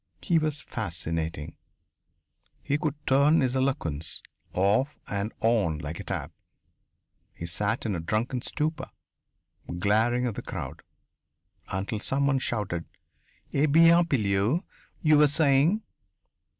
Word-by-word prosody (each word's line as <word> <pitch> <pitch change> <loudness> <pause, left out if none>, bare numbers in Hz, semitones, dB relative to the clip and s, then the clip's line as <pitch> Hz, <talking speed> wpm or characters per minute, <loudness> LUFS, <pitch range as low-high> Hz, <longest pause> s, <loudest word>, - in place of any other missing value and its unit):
He 170 -2 +3
was 155 -2 -2
fascinating. 80 - -4 1.1
He 145 +1 0
could 155 -3 -1
turn 140 +4 +4
his 130 -1 0
eloquence 85 - -2 0.3
off 105 +10 +1
and 100 +2 -2
on 105 -9 +2
like 75 +2 -6
a - - -5
tap. - - -4 1.0
He 85 - -6
sat 105 +8 -1
in 110 - 0
a 90 - -2
drunken 110 +9 -1
stupor, 155 +4 -3 0.9
glaring 110 +6 +2
at 120 - -1
the - - -5
crowd, - - -6 0.9
until 100 +4 -3
someone 135 +3 +1
shouted: 100 -9 -2 0.7
"Eh 145 +3 +3
bien, 165 +3 +6
Pilleux 110 - +1 0.4
you 155 -2 +5
were 150 - +7
saying?" 150 +7 +3
120 Hz, 120 wpm, -27 LUFS, 95-145 Hz, 1.1 s, were